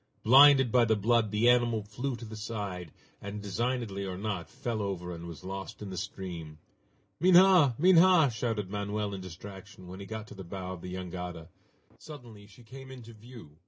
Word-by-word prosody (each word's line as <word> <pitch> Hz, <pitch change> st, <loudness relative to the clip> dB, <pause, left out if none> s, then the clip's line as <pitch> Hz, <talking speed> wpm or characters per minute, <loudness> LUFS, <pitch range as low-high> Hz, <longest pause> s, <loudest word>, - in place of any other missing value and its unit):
Blinded 135 Hz, 0 st, +7 dB
by 125 Hz, 0 st, +4 dB
the 110 Hz, -1 st, +2 dB
blood, 110 Hz, +1 st, +2 dB
the 105 Hz, +3 st, +1 dB
animal 120 Hz, -3 st, +3 dB
flew 125 Hz, +6 st, -4 dB
to 115 Hz, -, -9 dB
the 110 Hz, 0 st, -9 dB
side, 100 Hz, -6 st, -6 dB, 0.3 s
and, 100 Hz, +1 st, -6 dB
designedly 105 Hz, 0 st, -3 dB
or 95 Hz, -2 st, -5 dB
not, 100 Hz, -4 st, -4 dB
fell 115 Hz, -3 st, -4 dB
over 90 Hz, -3 st, -4 dB
and 85 Hz, 0 st, -8 dB
was 85 Hz, -3 st, -10 dB
lost 95 Hz, +1 st, -7 dB
in 105 Hz, -2 st, -7 dB
the -, -, -6 dB
stream. 90 Hz, -6 st, -7 dB, 0.6 s
"Minha! 180 Hz, -6 st, +6 dB
Minha!" 175 Hz, -3 st, +5 dB
shouted 110 Hz, -4 st, -3 dB
Manoel 105 Hz, 0 st, -3 dB
in 95 Hz, -, -6 dB
distraction, 95 Hz, +1 st, -11 dB
when 95 Hz, +2 st, -9 dB
he 100 Hz, -, -9 dB
got 110 Hz, 0 st, -6 dB
to -, -, -10 dB
the 95 Hz, -, -9 dB
bow 95 Hz, +1 st, -6 dB
of 90 Hz, -, -10 dB
the 90 Hz, +1 st, -7 dB
jangada. 90 Hz, -2 st, -7 dB, 0.5 s
Suddenly 120 Hz, -9 st, -12 dB
she 110 Hz, +4 st, -18 dB
came 130 Hz, +4 st, -12 dB
into 120 Hz, -3 st, -11 dB
view. 110 Hz, -9 st, -14 dB
105 Hz, 185 wpm, -29 LUFS, 95-120 Hz, 0.6 s, Blinded